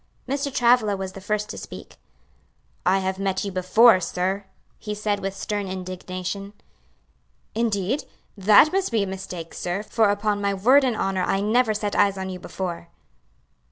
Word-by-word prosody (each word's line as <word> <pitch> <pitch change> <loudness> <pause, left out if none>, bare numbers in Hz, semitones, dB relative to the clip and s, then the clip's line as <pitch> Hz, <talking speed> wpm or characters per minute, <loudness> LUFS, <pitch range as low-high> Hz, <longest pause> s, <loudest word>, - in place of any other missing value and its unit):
Mr. 280 +1 -2
Travilla 235 -5 +3
was 190 -1 -4
the 195 - -10
first 210 +1 -1
to - - -6
speak. - - -10 0.9
"I 190 +1 +5
have 190 0 -2
met 195 0 -1
you 200 - -3
before, 185 +4 +5
sir!" 185 +3 -2 0.3
he 210 -1 -5
said 210 -1 -1
with 195 0 -4
stern 205 0 -3
indignation. 185 +1 -5 1.0
"Indeed! 220 +2 -1 0.3
that 210 - +6
must 385 -5 0
be 220 -3 +2
a - - -1
mistake, 185 -3 -7
sir, 180 +4 -3
for 220 -1 +2
upon 205 0 0
my 200 0 0
word 255 +9 +5
and 250 -3 +1
honor 195 -2 -1
I 195 - +1
never 215 +2 +2
set 205 -1 -2
eyes 200 -1 +3
on 190 0 -4
you 180 - -6
before." 175 -2 -5
200 Hz, 165 wpm, -24 LUFS, 190-215 Hz, 1.0 s, that